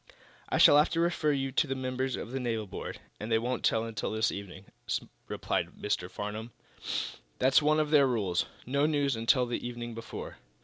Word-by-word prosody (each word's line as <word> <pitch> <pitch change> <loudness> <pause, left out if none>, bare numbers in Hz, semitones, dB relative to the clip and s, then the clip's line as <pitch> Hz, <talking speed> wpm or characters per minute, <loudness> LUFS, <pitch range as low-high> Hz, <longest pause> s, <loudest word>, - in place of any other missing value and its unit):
"I - - +1
shall 145 - +8
have 150 - +4
to 165 - +1
refer 170 -3 +2
you 135 -1 -1
to 150 +3 +2
the 135 - -1
members 130 0 -2
of 115 - -6
the 135 - -2
naval 115 -4 -1
board, 95 - -6 0.2
and 110 +2 -5
they 110 - +5
won't 125 +3 -2
tell 110 0 +3
until 115 -2 -3
this 110 +1 +1
evening," 100 -1 -8 0.6
replied - - -2
Mr. 95 -3 -1
Farnum. 105 +4 -5 0.9
"That's 130 +3 +5
one 155 +1 +3
of 150 -1 0
their 145 -3 +6
rules 100 -8 0 0.2
no 140 +4 +2
news 145 -4 +1
until 115 +3 +3
the 120 0 -3
evening 120 -1 -5
before. 115 0 -7
125 Hz, 190 wpm, -30 LUFS, 110-140 Hz, 0.9 s, shall